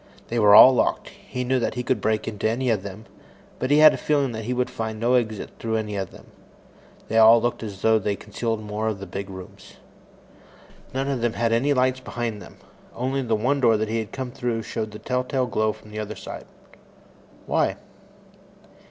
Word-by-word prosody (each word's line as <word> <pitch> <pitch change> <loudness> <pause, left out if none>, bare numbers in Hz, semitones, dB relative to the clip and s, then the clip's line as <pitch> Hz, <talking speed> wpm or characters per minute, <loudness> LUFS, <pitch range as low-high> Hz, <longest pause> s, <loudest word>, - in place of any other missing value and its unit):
They 120 - -1
were 105 -1 +7
all 130 +4 +10
locked. 125 - 0
He 125 - -6
knew 130 +1 +1
that 115 - -2
he 125 - -3
could 130 0 0
break 110 -1 0
into 110 -1 -1
any 125 +2 0
of 105 -4 0
them, 100 +3 -9 0.5
but 130 - -2
he 145 - +5
had 155 0 +8
a - - -3
feeling 145 -4 0
that 110 -1 -6
he 125 - -3
would 125 0 -1
find 110 -1 -4
no 120 +2 +1
exit 110 -4 0
through 115 -1 -2
any 105 -2 -2
of 95 -2 -3
them. - - -15 0.8
They 115 - +2
all 115 +1 +8
looked 120 +1 -2
as 100 -4 -8
though 110 0 +4
they 100 0 -1
concealed 110 +2 -4
more 105 +1 -3
of 110 -2 -1
the 100 - -8
big 100 +2 -6
rooms. 95 -2 -11 1.2
None 135 +1 -2
of 135 -4 -2
them 120 -1 0
had 115 -1 0
any 130 +5 +2
lights 130 0 +2
behind 115 -4 -4
them. - - -13 0.4
Only 130 +2 -1
the 115 -3 0
one 130 +7 0
door 115 -4 +4
that 110 0 -2
he 115 +1 -1
had 110 - -5
come 130 -2 -5
through 120 -2 -3
showed 110 0 -4
the 105 - -9
telltale 125 +2 -1
glow 110 -3 0
from 105 - -15
the 105 - -5
other 110 0 -5
side. - - -8 1.0
Why? - - +1
115 Hz, 215 wpm, -24 LUFS, 110-125 Hz, 1.2 s, all